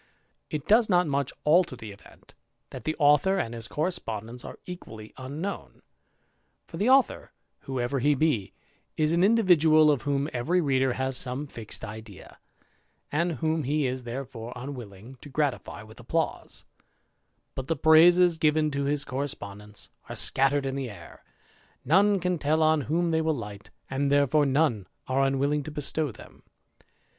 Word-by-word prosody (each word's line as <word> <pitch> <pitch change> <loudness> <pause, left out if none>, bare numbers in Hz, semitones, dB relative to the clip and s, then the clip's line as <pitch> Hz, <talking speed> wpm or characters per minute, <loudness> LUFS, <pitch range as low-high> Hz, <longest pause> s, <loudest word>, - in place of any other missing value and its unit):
It 150 -2 -5
does 220 +1 +4
not 180 -2 +4
much 140 -3 -1
alter 165 -2 +3
the 110 -3 -9
event, 100 - -17 0.4
that - - -9
the 155 - -1
author 150 +6 +4
and 120 -11 -2
his 115 -1 -5
correspondents 125 - -4
are - - -9
equally 110 -12 -10
unknown; 145 +10 -6 0.8
for - - -9
the 215 +5 +1
author, 265 0 +2 0.3
whoever 130 0 -2
he 145 +3 +3
be, 135 -9 0 0.5
is 155 +1 +2
an 170 +1 +3
individual 165 -8 +5
of 140 - 0
whom 140 -1 -1
every 150 +9 +1
reader 135 -5 +1
has 130 +1 -2
some 130 +3 -3
fixed 115 -6 -4
idea, 105 -2 -11 0.7
andj 170 +2 0
whom 160 +4 -1
he 145 +2 0
is 130 0 -2
therefore 120 -1 -6
unwilling 125 -3 -9
to 145 - -11
gratify 140 -6 -2
with 110 +2 -15
applause; 160 +7 -3 0.9
balfl 130 -1 -5
the 165 - 0
praises 165 +3 +5
given 155 0 +2
to 140 0 -2
his 145 +1 0
correspondents 105 -7 -6 0.2
are - - -5
scattered 135 +1 +1
in 135 - -2
tha 135 -2 -4
air, 95 -6 -13 0.6
none 195 +7 +4
can 180 -1 -1
tell 155 +2 +1
on 155 -1 +3
whom 170 +2 +1
they 160 0 +2
will 160 -1 0
light, 105 -3 -8 0.2
and 140 +1 -1
therefore 145 +1 +3
none 130 - +1 0.2
are 130 +1 +1
unwilling 135 +2 +1
to 145 - -7
bestow 150 0 -1
them. - - -15
145 Hz, 155 wpm, -27 LUFS, 125-160 Hz, 0.9 s, individual